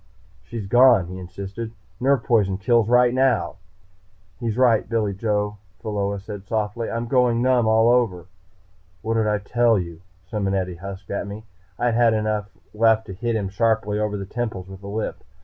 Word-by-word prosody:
"She's 115 -4 -7
gone," 120 -2 +5
he 95 0 -7
insisted. 100 +5 -7 0.3
"Nerve 135 -1 +2
poison 100 -6 +2
kills 115 +2 +2
right 125 0 +5
now." 130 -3 +1 0.8
"He's 115 -2 -2
right, 120 -5 +3
Billy 110 -3 0
Joe," 105 0 -1 0.2
Pheola 100 -2 -2
said 100 -1 -9
softly. 110 +1 -2
"I'm 115 +1 -2
going 125 -1 +2
numb 125 -3 +3
all 110 +1 +4
over." 115 -8 +2 0.8
"What 110 +1 -1
did 110 -1 +1
I 105 0 +2
tell 115 +2 +2
you?" 85 -2 -5 0.2
Simonetti 95 -4 -2
husked 100 +1 -8
at 100 0 -3
me. 105 +2 -7 0.3
I 120 - +1
had 115 -1 +3
enough 105 -1 -1 0.2
left 110 0 +3
to 95 - -7
hit 115 +4 -2
him 100 -3 -1
sharply 105 0 0
over 105 -1 -1
the 100 - -5
temples 105 -3 -4
with 95 0 -11
a 100 - -9
lift. 105 +2 -4
110 Hz, 170 wpm, -23 LUFS, 100-115 Hz, 0.8 s, gone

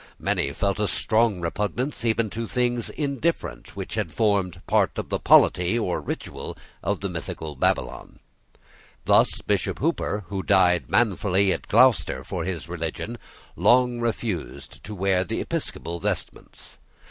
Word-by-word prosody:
Many 70 - 0
felt 100 +7 -1
a 105 - +2
strong 110 -4 +1
repugnance 110 - -2
even 115 -2 +1
to 115 0 -4
things 120 -1 0
indifferent 140 - -2
which - - -5
had 80 - -2
formed 100 -1 +1
part - - +2
of - - -4
the - - -1
polity 90 +5 +5
or 100 -6 -1
ritual - - -6 0.2
of 100 +2 -1
the 100 - -1
mystical 80 -3 -6
Babylon. 60 -1 -1 0.9
Thus - - +3
Bishop - - 0
Hooper, 105 +1 -1
who 100 -1 -2
died 90 -3 +3
manfully 100 -3 +2
at - - -6
Gloucester 125 +2 +4
for 85 -3 -4
his 85 -4 -4
religion, 85 +7 -5 0.4
long 120 +5 +4
refused 100 - -4
to 105 - -6
wear 95 -1 +2
the 90 - -3
episcopal 85 +1 -4
vestments. 100 -1 -5
100 Hz, 140 wpm, -25 LUFS, 90-115 Hz, 0.9 s, polity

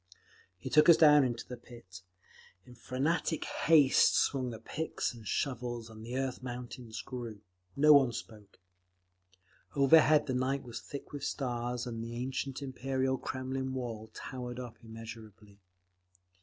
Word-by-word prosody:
He 90 - -7
took 150 +2 +6
us 170 - +9
down 150 -2 +7
into 120 -2 -3
the 125 - -7
pit. 115 -6 -13 0.6
In 125 - -14
frantic 140 +7 -1
haste 150 -4 +4
swung 130 -3 +1
the 115 - -6
picks 160 +4 -3
and 115 -3 -11
shovels, 120 -3 -2
and 110 0 -11
the 120 +3 -4
earth—mountains 125 -3 -5
grew. 120 -5 -7 0.3
No 150 +2 +7
one 135 -4 +6
spoke. 105 -3 -10 1.2
Overhead 150 +2 +6
the 130 - -2
night 130 +2 0
was 120 -2 -7
thick 140 - -9
with 145 -1 -6
stars, 120 -3 -2
and 115 -2 -5
the 115 +1 -6
ancient 130 +2 -3
Imperial 130 0 -1
Kremlin 130 0 -4
wall 115 -4 -5
towered 125 -1 -6
up 120 -2 -7
immeasurably. 110 -2 -11
125 Hz, 140 wpm, -32 LUFS, 115-135 Hz, 1.2 s, us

